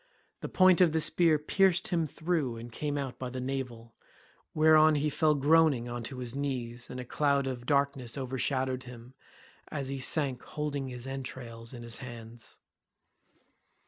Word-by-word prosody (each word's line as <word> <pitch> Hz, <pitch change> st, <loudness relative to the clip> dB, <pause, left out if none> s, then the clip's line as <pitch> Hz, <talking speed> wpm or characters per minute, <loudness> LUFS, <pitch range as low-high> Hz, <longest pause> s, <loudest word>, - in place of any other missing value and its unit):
The -, -, -6 dB
point 185 Hz, -1 st, +5 dB
of 170 Hz, -4 st, +5 dB
the 160 Hz, -, +2 dB
spear 160 Hz, 0 st, +3 dB
pierced 185 Hz, +4 st, +2 dB
him 165 Hz, -4 st, +1 dB
through 155 Hz, -6 st, -2 dB
and 115 Hz, +1 st, -9 dB
came 145 Hz, +4 st, -3 dB
out 135 Hz, -3 st, -4 dB
by 130 Hz, -, -4 dB
the 130 Hz, +1 st, -5 dB
navel, 125 Hz, -3 st, -5 dB, 0.6 s
whereon 155 Hz, 0 st, +6 dB
he 150 Hz, +1 st, 0 dB
fell 155 Hz, +1 st, +3 dB
groaning 145 Hz, -3 st, +4 dB
on 120 Hz, 0 st, -4 dB
to 130 Hz, +1 st, -5 dB
his 125 Hz, -2 st, -4 dB
knees 125 Hz, -4 st, -4 dB
and 125 Hz, -, -6 dB
a 125 Hz, -, -6 dB
cloud 140 Hz, +1 st, +1 dB
of 125 Hz, -2 st, -5 dB
darkness 140 Hz, -3 st, 0 dB
overshadowed 130 Hz, 0 st, -1 dB
him 125 Hz, 0 st, -11 dB, 0.5 s
as 140 Hz, -3 st, -4 dB
he 135 Hz, 0 st, -3 dB
sank 135 Hz, -2 st, 0 dB
holding 145 Hz, -3 st, -4 dB
his 125 Hz, -1 st, -7 dB
entrails 125 Hz, -4 st, -7 dB
in 120 Hz, -2 st, -9 dB
his 115 Hz, -1 st, -2 dB
hands. 120 Hz, -2 st, -10 dB
135 Hz, 165 wpm, -30 LUFS, 125-150 Hz, 0.6 s, whereon